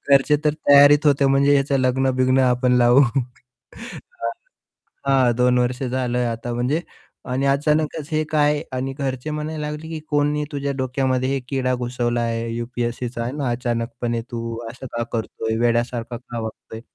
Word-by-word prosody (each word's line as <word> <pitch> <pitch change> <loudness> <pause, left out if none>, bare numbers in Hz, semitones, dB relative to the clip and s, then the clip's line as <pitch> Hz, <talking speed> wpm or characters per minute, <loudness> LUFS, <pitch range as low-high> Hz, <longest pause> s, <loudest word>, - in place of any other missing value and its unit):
घरचे 140 +2 +3
तर 150 - +3 0.2
तयारीत 145 +1 +7
होते 140 -1 +4
म्हणजे 140 +1 +4
ह्याचं 140 0 +2
लग्न-बिग्न 130 0 +2
आपण 125 0 +2
लावू. 120 +2 +6
हां, 125 - -5 0.8
हां. 130 -3 +4
2 125 0 +3
वर्ष 125 +1 0
झालं 125 -1 -1
आता 115 +1 -4
म्हणजे 125 +7 0 0.5
आणि 135 +2 0
अचानकच 150 +2 +1
हे 155 0 +2
काय 150 -1 +2
आणि 130 +1 -2
घरचे 135 +1 -3
म्हणायला 150 0 -4
लागले, 150 +2 -6
की 160 -1 -5
"कोणी 150 0 +1
तुझ्या 140 0 -2
डोक्यामध्ये 130 0 0
हे 135 0 0
किडा 130 -2 0
घुसवलाय 120 -2 -1
आहे 115 0 -4
यू-पी-एस-सीचा 120 0 -3
आहे 125 - -3
ना. 140 -3 -2
अचानकपणे 120 -1 -2
तू 115 -1 -4
असं 125 +2 -9
का 120 - 0
करतोय 110 -1 -2
वेड्यासारखा 120 0 0
का 120 -1 -7
वागतोय?" 110 0 -7
130 Hz, 150 wpm, -22 LUFS, 120-140 Hz, 0.8 s, तयारीत